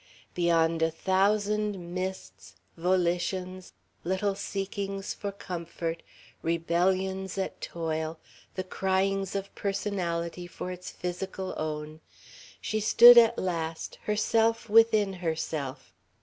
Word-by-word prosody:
Beyond 165 -2 +2
a 160 - +3
thousand 200 +1 0
mists, 185 - -6 0.2
volitions, 180 +1 -1 0.3
little 190 +3 0
seekings 195 0 -4
for 200 -1 -5
comfort, 170 -3 -5 0.4
rebellions 185 +3 0
at 190 - -3
toil, 160 -1 -3 0.4
the 185 - -2
cryings 195 +1 0
of 195 0 -4
personality 180 -4 -2
for 180 +1 -6
its 180 0 -7
physical 185 +1 -5
own, 155 0 -4 0.6
she 215 - -2
stood 235 +3 +9
at 230 0 +4
last, 165 -3 -3
herself 225 +2 +1
within 220 -3 +5
herself. 155 -5 -3
185 Hz, 100 wpm, -28 LUFS, 170-195 Hz, 0.6 s, stood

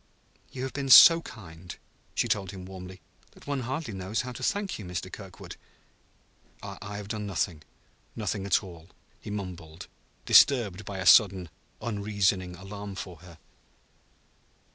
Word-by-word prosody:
"You 130 - -6
have 135 - -4
been 135 -1 -4
so 165 +5 +10
kind," 90 - -11 0.4
she - - +1
told 95 -3 -1
him 95 -1 -8
warmly, 95 0 -10 0.3
"that - - -18
one 140 -1 -2
hardly 130 0 -4
knows 95 +3 -2
how 125 0 -6
to 120 - -9
thank 200 - -1
you, - - -7
Mr. 90 -2 -6
Kirkwood." - - -10 1.1
"I 100 0 -7
have 105 -1 -7
done 105 -2 -4
nothing 85 -3 -2 0.5
nothing 105 -3 -3
at 100 - +2
all," 85 -2 -12 0.3
he - - -10
mumbled, 90 -6 -7 0.4
disturbed 110 -7 +5
by 100 - -6
a 95 - -4
sudden, 95 -6 +5 0.3
unreasoning 100 -4 -1
alarm 100 +2 -8
for 90 -3 -7
her. 85 0 -15
100 Hz, 145 wpm, -28 LUFS, 90-110 Hz, 1.1 s, so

